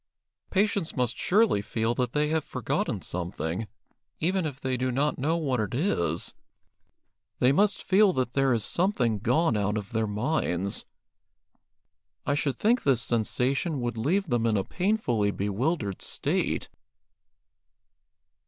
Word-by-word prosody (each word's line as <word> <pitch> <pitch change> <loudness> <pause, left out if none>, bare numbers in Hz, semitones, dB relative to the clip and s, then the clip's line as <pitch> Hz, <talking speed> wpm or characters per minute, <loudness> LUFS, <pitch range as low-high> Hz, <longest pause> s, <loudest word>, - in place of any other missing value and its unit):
"Patients 200 -3 0
must 125 -3 0
surely 205 - +3
feel 110 +3 -1
that 125 -1 -1
they 150 0 +1
have 160 -1 +1
forgotten - - -2
something, 90 +3 -3 0.5
even 180 +1 +1
if 135 -3 -7
they 130 -1 -1
do 130 +1 -1
not 140 +4 0
know 155 +5 +1
what 135 -7 0
it 105 0 -2
is. 85 - 0 1.0
They 125 - +4
must 200 +6 +2
feel 200 +1 +5
that 130 -3 -1
there 135 -1 +2
is 115 -4 +1
something 130 - +1
gone 125 - +2
out 105 0 0
of 100 -1 -6
their 110 -1 0
minds. 105 - -1 1.4
I - - +1
should 140 -3 -1
think 235 +3 +2
this 130 -5 +2
sensation 130 - 0
would 120 -1 -2
leave 165 - +1
them 120 -4 +1
in 110 -2 +2
a 95 - +1
painfully 175 - 0
bewildered 105 - -1
state." - - -1
130 Hz, 140 wpm, -27 LUFS, 110-160 Hz, 1.4 s, feel